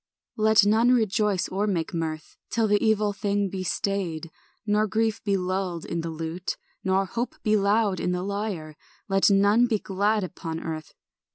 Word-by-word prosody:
Let 215 Hz, -1 st, +5 dB
none 220 Hz, +4 st, +4 dB
rejoice 210 Hz, -4 st, +1 dB
or 200 Hz, +3 st, -1 dB
make 180 Hz, -3 st, -1 dB
mirth 160 Hz, -2 st, -4 dB
Till 225 Hz, -1 st, +1 dB
the 205 Hz, 0 st, +2 dB
evil 215 Hz, -2 st, +2 dB
thing 200 Hz, 0 st, 0 dB
be 190 Hz, -, -4 dB
stayed, 175 Hz, -4 st, -2 dB, 0.3 s
Nor 210 Hz, 0 st, +2 dB
grief 220 Hz, +1 st, 0 dB
be 200 Hz, -2 st, +1 dB
lulled 185 Hz, -2 st, -2 dB
in 170 Hz, -, -3 dB
the 165 Hz, -, -4 dB
lute, 165 Hz, +3 st, -4 dB, 0.3 s
Nor 190 Hz, 0 st, +2 dB
hope 235 Hz, +5 st, -3 dB
be 215 Hz, 0 st, +3 dB
loud 200 Hz, -1 st, +2 dB
on 180 Hz, -, 0 dB
the 180 Hz, 0 st, -1 dB
lyre; 200 Hz, -6 st, -4 dB, 0.3 s
Let 195 Hz, 0 st, +4 dB
none 205 Hz, +4 st, +4 dB
be 225 Hz, -3 st, +1 dB
glad 205 Hz, +2 st, 0 dB
upon 165 Hz, -3 st, -5 dB
earth. 160 Hz, -2 st, -6 dB
200 Hz, 170 wpm, -26 LUFS, 180-215 Hz, 0.3 s, Let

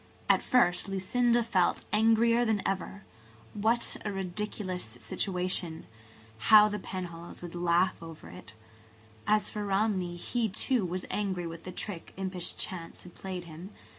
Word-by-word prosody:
At -, -, +4 dB
first 200 Hz, -7 st, +3 dB
Lucinda 235 Hz, +5 st, +2 dB
felt 200 Hz, -6 st, +1 dB
angrier 225 Hz, +2 st, +4 dB
than 220 Hz, -4 st, 0 dB
ever. 195 Hz, 0 st, -3 dB, 0.5 s
What 225 Hz, +3 st, +1 dB
a 210 Hz, -, -2 dB
ridiculous 190 Hz, 0 st, -3 dB
situation! 170 Hz, -, -1 dB, 0.6 s
How 215 Hz, -1 st, +9 dB
the 210 Hz, 0 st, -3 dB
Penhallows 175 Hz, -3 st, -7 dB
would 175 Hz, -, -7 dB
laugh 175 Hz, +1 st, +1 dB
over 165 Hz, -, -10 dB
it! 90 Hz, +5 st, -11 dB, 0.7 s
As 210 Hz, 0 st, +2 dB
for 210 Hz, -, -4 dB
Romney, 195 Hz, -3 st, 0 dB
he, 225 Hz, +6 st, -1 dB
too, 220 Hz, +2 st, +2 dB
was 180 Hz, +1 st, -4 dB
angry 190 Hz, -4 st, -2 dB
with 165 Hz, 0 st, -8 dB
the 185 Hz, -, -5 dB
trick 180 Hz, -1 st, -5 dB
impish 185 Hz, -2 st, 0 dB
chance 170 Hz, -3 st, -4 dB
had 180 Hz, -, -13 dB
played 185 Hz, -2 st, -6 dB
him. 170 Hz, +3 st, -10 dB
190 Hz, 140 wpm, -30 LUFS, 175-210 Hz, 0.7 s, How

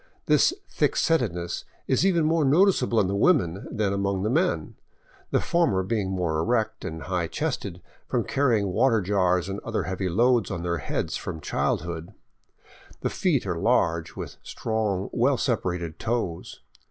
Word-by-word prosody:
This -, -, +4 dB, 0.2 s
thick -, -, 0 dB
setness 90 Hz, -, 0 dB, 0.2 s
is 130 Hz, -, +2 dB
even 175 Hz, -5 st, +3 dB
more 160 Hz, 0 st, +2 dB
noticeable 140 Hz, -, +3 dB
in 100 Hz, -, +3 dB
the 95 Hz, +2 st, -1 dB
women 100 Hz, -, +2 dB
than 105 Hz, -2 st, 0 dB
among 100 Hz, -1 st, -1 dB
the 110 Hz, -, 0 dB
men, 175 Hz, +7 st, 0 dB, 0.6 s
the -, -, +2 dB
former 160 Hz, -, +1 dB
being 100 Hz, -1 st, -1 dB
more 90 Hz, -4 st, -1 dB
erect 110 Hz, +3 st, 0 dB
and 80 Hz, -1 st, -5 dB
high 90 Hz, -1 st, -1 dB
chested 100 Hz, -, -3 dB, 0.2 s
from -, -, 0 dB
carrying 115 Hz, -8 st, +1 dB
water 115 Hz, +3 st, +3 dB
jars 90 Hz, -2 st, +1 dB
and 100 Hz, +1 st, -4 dB
other 110 Hz, -4 st, -2 dB
heavy 95 Hz, +2 st, -2 dB
loads 120 Hz, +2 st, +3 dB
on 85 Hz, -3 st, -4 dB
their 85 Hz, -1 st, -1 dB
heads -, -, -2 dB
from 80 Hz, -, -6 dB
childhood. 85 Hz, +4 st, -2 dB, 0.9 s
The -, -, -1 dB
feet 165 Hz, -, +1 dB
are 90 Hz, -3 st, -2 dB
large, 85 Hz, -7 st, +1 dB
with -, -, -7 dB
strong, 105 Hz, -4 st, -2 dB
well -, -, +2 dB
separated 85 Hz, -3 st, -2 dB
toes. 110 Hz, -8 st, -3 dB
100 Hz, 155 wpm, -26 LUFS, 90-120 Hz, 0.9 s, This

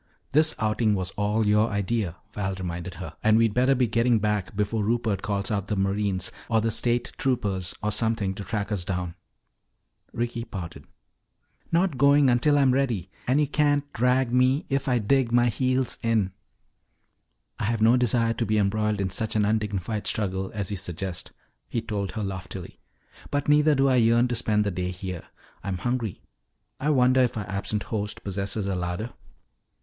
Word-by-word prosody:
"This 155 Hz, +2 st, +3 dB
outing 110 Hz, -1 st, +1 dB
was 95 Hz, -1 st, -2 dB
all 105 Hz, +2 st, 0 dB
your 105 Hz, +2 st, +3 dB
idea," 100 Hz, -3 st, -1 dB, 0.2 s
Val 95 Hz, -2 st, -2 dB
reminded 90 Hz, -1 st, -5 dB
her. 90 Hz, -, -7 dB
"And 110 Hz, 0 st, +5 dB
we'd 115 Hz, -2 st, +3 dB
better 130 Hz, +3 st, +3 dB
be 125 Hz, -1 st, +3 dB
getting 115 Hz, +1 st, +2 dB
back 105 Hz, -2 st, -1 dB
before 105 Hz, +1 st, 0 dB
Rupert 110 Hz, -2 st, 0 dB
calls 100 Hz, -3 st, -2 dB
out 100 Hz, -2 st, -1 dB
the 105 Hz, -, -1 dB
Marines 95 Hz, -1 st, 0 dB, 0.2 s
or 115 Hz, -2 st, +3 dB
the 115 Hz, +1 st, 0 dB
State 120 Hz, +2 st, 0 dB
Troopers 100 Hz, -9 st, -1 dB
or 105 Hz, -, +1 dB
something 110 Hz, -3 st, 0 dB
to 100 Hz, -, -7 dB
track 105 Hz, 0 st, -3 dB
us 100 Hz, -4 st, -1 dB
down." 90 Hz, -2 st, -3 dB, 1.0 s
Ricky 115 Hz, 0 st, -3 dB
pouted. 90 Hz, -7 st, -7 dB, 0.9 s
"Not 170 Hz, -5 st, +1 dB
going 140 Hz, -1 st, +5 dB
until 145 Hz, +5 st, +3 dB
I'm 135 Hz, -2 st, +4 dB
ready. 115 Hz, -10 st, -1 dB, 0.2 s
And 130 Hz, +4 st, +3 dB
you 150 Hz, -, +4 dB
can't 145 Hz, 0 st, +1 dB
drag 125 Hz, +1 st, +2 dB
me 130 Hz, +3 st, +3 dB
if 135 Hz, 0 st, -1 dB
I 125 Hz, -2 st, +3 dB
dig 120 Hz, +2 st, +2 dB
my 120 Hz, 0 st, +4 dB
heels 130 Hz, +2 st, 0 dB
in." 110 Hz, -5 st, +1 dB, 1.3 s
"I -, -, -1 dB
have 110 Hz, 0 st, 0 dB
no 115 Hz, +2 st, +6 dB
desire 120 Hz, -2 st, +2 dB
to 115 Hz, +1 st, -2 dB
be 110 Hz, +1 st, +2 dB
embroiled 105 Hz, +1 st, +1 dB
in 95 Hz, -2 st, -1 dB
such 110 Hz, +4 st, -2 dB
an 105 Hz, -1 st, +3 dB
undignified 105 Hz, -1 st, -1 dB
struggle 95 Hz, -2 st, -1 dB
as 100 Hz, -1 st, -3 dB
you 100 Hz, -, -2 dB
suggest," 90 Hz, -1 st, -4 dB, 0.4 s
he 115 Hz, -, -1 dB
told 105 Hz, -4 st, -3 dB
her 110 Hz, -, -3 dB
loftily. 95 Hz, -2 st, -6 dB, 0.5 s
"But 145 Hz, 0 st, -1 dB
neither 150 Hz, +1 st, +5 dB
do 135 Hz, 0 st, +3 dB
I 130 Hz, -1 st, +4 dB
yearn 120 Hz, +1 st, +4 dB
to 120 Hz, -, -1 dB
spend 105 Hz, -2 st, +1 dB
the 100 Hz, -, -1 dB
day 90 Hz, 0 st, -2 dB
here. 90 Hz, -1 st, -6 dB, 0.4 s
I'm 95 Hz, -1 st, -2 dB
hungry. 120 Hz, 0 st, -2 dB, 0.6 s
I 145 Hz, -, 0 dB
wonder 130 Hz, -2 st, +4 dB
if 125 Hz, -2 st, +1 dB
our 105 Hz, -3 st, -4 dB
absent 100 Hz, +2 st, -2 dB
host 105 Hz, -1 st, -4 dB
possesses 100 Hz, +1 st, -2 dB
a 100 Hz, -, -1 dB
larder?" 90 Hz, +6 st, -3 dB
110 Hz, 180 wpm, -26 LUFS, 100-125 Hz, 1.3 s, no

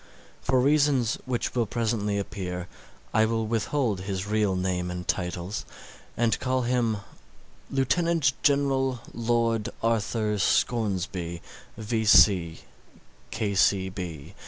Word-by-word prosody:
For 130 Hz, 0 st, +2 dB
reasons 140 Hz, -3 st, +2 dB
which 125 Hz, -2 st, -2 dB
will 120 Hz, -3 st, 0 dB
presently 110 Hz, -3 st, -1 dB
appear, 90 Hz, -3 st, -4 dB, 0.5 s
I 110 Hz, -, +4 dB
will 115 Hz, 0 st, -1 dB
withhold 110 Hz, -1 st, -1 dB
his 95 Hz, -1 st, -3 dB
real 105 Hz, -2 st, +1 dB
name 90 Hz, -1 st, -1 dB
and 90 Hz, 0 st, -6 dB
titles, 90 Hz, +4 st, -2 dB, 0.5 s
and 115 Hz, -1 st, +1 dB
call 130 Hz, 0 st, 0 dB
him 120 Hz, -3 st, +1 dB, 0.7 s
Lieutenant 145 Hz, +2 st, +2 dB
General 135 Hz, -3 st, +2 dB
Lord 115 Hz, -1 st, 0 dB
Arthur 110 Hz, -2 st, 0 dB
Scoresby, 95 Hz, -6 st, 0 dB, 0.3 s
V. 105 Hz, -6 st, +4 dB
110 Hz, 95 wpm, -26 LUFS, 95-125 Hz, 0.7 s, I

